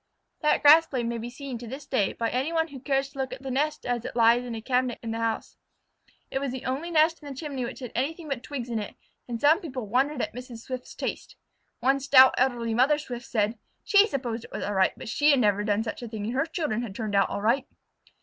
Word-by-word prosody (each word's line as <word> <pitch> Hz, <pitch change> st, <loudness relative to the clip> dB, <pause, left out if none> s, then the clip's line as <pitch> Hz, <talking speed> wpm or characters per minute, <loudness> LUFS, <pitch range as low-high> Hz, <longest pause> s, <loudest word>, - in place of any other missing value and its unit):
That 300 Hz, -, +2 dB
grass 315 Hz, +3 st, +8 dB
blade 250 Hz, -5 st, -2 dB
may 235 Hz, 0 st, -2 dB
be 235 Hz, +2 st, -5 dB
seen 260 Hz, -1 st, -7 dB
to 240 Hz, -, -8 dB
this 270 Hz, +5 st, -7 dB
day 210 Hz, -7 st, 0 dB
by 230 Hz, -1 st, -2 dB
any 265 Hz, +6 st, -1 dB
one 325 Hz, 0 st, +1 dB
who 275 Hz, -2 st, -9 dB
cares 270 Hz, 0 st, 0 dB
to 275 Hz, 0 st, -12 dB
look 265 Hz, -1 st, -2 dB
at 255 Hz, +1 st, -8 dB
the 265 Hz, -, -4 dB
nest 295 Hz, +4 st, -1 dB
as 245 Hz, -2 st, -1 dB
it -, -, -6 dB
lies 235 Hz, +1 st, +5 dB
in 240 Hz, -2 st, -5 dB
a -, -, -4 dB
cabinet 250 Hz, 0 st, 0 dB
in 225 Hz, -, -3 dB
the 225 Hz, -, -3 dB
house. 225 Hz, -1 st, -2 dB, 0.7 s
It 270 Hz, -, -1 dB
was 275 Hz, -2 st, -2 dB
the 260 Hz, 0 st, -6 dB
only 275 Hz, +7 st, -2 dB
nest 320 Hz, 0 st, +3 dB
in 290 Hz, -, -9 dB
the 270 Hz, -, -8 dB
chimney 275 Hz, -5 st, -3 dB
which 240 Hz, -, -7 dB
had 250 Hz, -, -6 dB
anything 310 Hz, +6 st, -2 dB
but 275 Hz, -4 st, -3 dB
twigs 255 Hz, -2 st, -5 dB
in 225 Hz, -, 0 dB
it, 205 Hz, -, -6 dB, 0.3 s
and 235 Hz, -2 st, -4 dB
some 310 Hz, -, +4 dB
people 260 Hz, -, -5 dB
wondered 260 Hz, +6 st, +1 dB
at -, -, -4 dB
Mrs. 245 Hz, -2 st, -8 dB
Swift's 255 Hz, +1 st, -7 dB
taste. -, -, -5 dB, 0.5 s
One 270 Hz, +1 st, +3 dB
stout 265 Hz, -1 st, +7 dB
elderly 240 Hz, -3 st, +1 dB
mother 260 Hz, +6 st, +4 dB
Swift 245 Hz, -5 st, -7 dB
said 215 Hz, 0 st, 0 dB, 0.2 s
"she 410 Hz, 0 st, +5 dB
supposed 240 Hz, -, -3 dB
it -, -, -15 dB
was -, -, -4 dB
all 205 Hz, -, -2 dB
right, 190 Hz, -1 st, +3 dB
but -, -, -16 dB
that -, -, -6 dB
she 290 Hz, +6 st, +3 dB
had 280 Hz, -3 st, +5 dB
never 205 Hz, -3 st, +2 dB
done 210 Hz, +1 st, +1 dB
such 225 Hz, -, -5 dB
a 240 Hz, -, -5 dB
thing 215 Hz, -2 st, -5 dB
and 230 Hz, -, -3 dB
her 275 Hz, +5 st, 0 dB
children 305 Hz, -, -2 dB
had 215 Hz, -5 st, -6 dB
turned 215 Hz, -2 st, -4 dB
out 195 Hz, 0 st, +3 dB
all 200 Hz, -, -4 dB
right." 255 Hz, +5 st, +2 dB
255 Hz, 265 wpm, -27 LUFS, 230-280 Hz, 0.7 s, grass